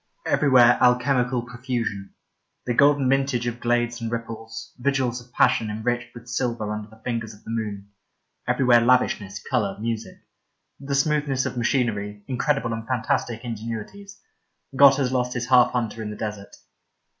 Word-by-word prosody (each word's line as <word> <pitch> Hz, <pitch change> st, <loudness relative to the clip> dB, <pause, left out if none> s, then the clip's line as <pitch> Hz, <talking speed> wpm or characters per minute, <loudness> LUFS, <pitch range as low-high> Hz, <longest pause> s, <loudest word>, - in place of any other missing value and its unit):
Everywhere 125 Hz, -4 st, +5 dB
alchemical 125 Hz, 0 st, +2 dB
profusion 120 Hz, -5 st, -4 dB, 0.2 s
— -, -, -38 dB
^the 120 Hz, -, 0 dB
golden 140 Hz, -1 st, +4 dB
mintage 135 Hz, -2 st, +1 dB
of 120 Hz, 0 st, -3 dB
glades 120 Hz, 0 st, 0 dB
and 115 Hz, 0 st, -3 dB
ripples, 115 Hz, -1 st, -6 dB
vigils 130 Hz, -2 st, 0 dB
of 120 Hz, 0 st, -19 dB
passion 110 Hz, -2 st, +2 dB
enriched 120 Hz, +3 st, -3 dB
with 115 Hz, 0 st, -12 dB
silver 115 Hz, -3 st, -2 dB
under 105 Hz, 0 st, -6 dB
the 110 Hz, +1 st, -18 dB
fingers 115 Hz, -3 st, -3 dB
of 105 Hz, -, -21 dB
the -, -, -7 dB
moon; 105 Hz, -3 st, -4 dB, 0.6 s
everywhere 125 Hz, -3 st, +4 dB
lavishness, 110 Hz, -5 st, +1 dB
colour, 100 Hz, -2 st, 0 dB
music; 115 Hz, 0 st, -4 dB, 0.6 s
the 140 Hz, 0 st, -3 dB
smoothness 140 Hz, -2 st, +1 dB
of -, -, -3 dB
machinery, 110 Hz, -5 st, -1 dB
incredible 130 Hz, -2 st, 0 dB
and 115 Hz, 0 st, -6 dB
fantastic 115 Hz, -1 st, -1 dB
ingenuities. 115 Hz, -, -7 dB, 0.6 s
God 140 Hz, 0 st, +8 dB
has 135 Hz, -2 st, 0 dB
lost 125 Hz, -1 st, 0 dB
his 120 Hz, 0 st, -4 dB
half 125 Hz, -2 st, +6 dB
hunter 115 Hz, -2 st, -2 dB
in 110 Hz, -, -4 dB
the 105 Hz, -, -7 dB
desert. 105 Hz, -2 st, -6 dB
120 Hz, 155 wpm, -24 LUFS, 110-130 Hz, 0.6 s, God